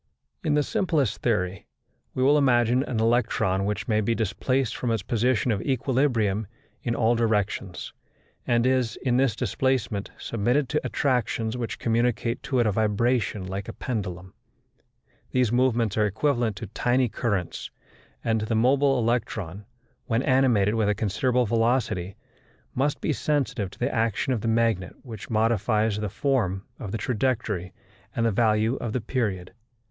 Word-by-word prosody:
In 155 -3 +1
the 150 - +3
simplest 160 - 0
theory, 95 -6 -1 0.5
we 130 - +1
will 140 +3 +5
imagine 120 -2 +3
an 125 -4 -2
electron 110 -4 +1
which 105 +1 -2
may 110 -2 +2
be 115 +2 0
displaced 115 +3 0
from 125 - -2
its 115 -4 0
position 120 +2 +1
of 100 -2 -1
equilibrium 125 -6 +1 0.3
in 120 -1 -1
all 115 +1 +3
directions, 105 -5 -1 0.5
and 120 -1 +2
is, 130 -3 +1
in 125 -2 +2
this 130 -4 +2
displacement, 120 -6 -1
submitted 120 +5 0
to 150 - 0
attractions 120 -4 0
which 120 -2 -4
communicate 120 0 0
to 130 - -2
it 120 - +3
a 105 - +3
vibration 110 -1 0
like 95 +1 -5
a - - -6
pendulum. 95 -6 -4 1.0
These 125 -4 +1
movements 120 -4 +2
are 105 - +4
equivalent 120 0 0
to 115 - -6
tiny 120 +5 +1
currents, 100 -6 -2 0.5
and 110 -1 +1
the 110 +1 -1
mobile 135 +4 +3
electron, 110 -5 -2 0.4
when 115 +3 +1
animated 125 -7 +3
with 110 -2 +1
a 105 - +2
considerable 115 +5 +1
velocity, 115 -5 0 0.6
must 140 +3 0
be 155 - 0
sensitive 135 -10 -1
to - - -15
the 120 - -1
action 115 +3 0
of 115 - -2
the 115 - -2
magnet 115 -5 +1
which 110 -6 -9
modifies 110 -1 +1
the 105 -1 -2
form 105 -5 0 0.2
of 105 -7 -6
the 115 - -2
trajectory 110 -7 -1 0.4
and 115 - +1
the 115 - +3
value 110 +3 +2
of 115 -3 -4
the 125 - -1
period. 105 -7 -2
115 Hz, 155 wpm, -26 LUFS, 105-125 Hz, 1.0 s, will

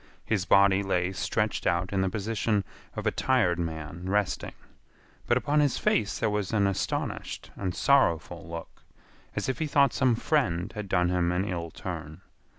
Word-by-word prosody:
His 100 -5 0
body 100 0 +5
lay 95 -2 0
stretched 95 - -1
out 85 +2 0
in 95 - +2
the 95 - +1
position 105 0 0 0.3
of - - -4
a - - +3
tired 115 -10 +2
man 80 +1 -4
resting, 105 -1 0 0.7
but 120 - +4
upon 145 +3 +1
his 145 -4 +2
face 105 -2 +1
there 110 - 0
was 105 -2 -1
an 105 -3 +2
astonished 100 -1 -3
and 90 -3 -3
sorrowful 85 - +2
look, 85 0 -8 0.5
as - - -2
if 130 - -2
he 160 - 0
thought 140 -1 +4
some 130 -4 +3
friend 110 - 0
had 105 -3 -6
done 90 -1 +2
him 90 -1 +1
an 90 +2 0
ill 85 -4 -3
turn. 80 -3 -7
95 Hz, 170 wpm, -28 LUFS, 85-110 Hz, 0.7 s, body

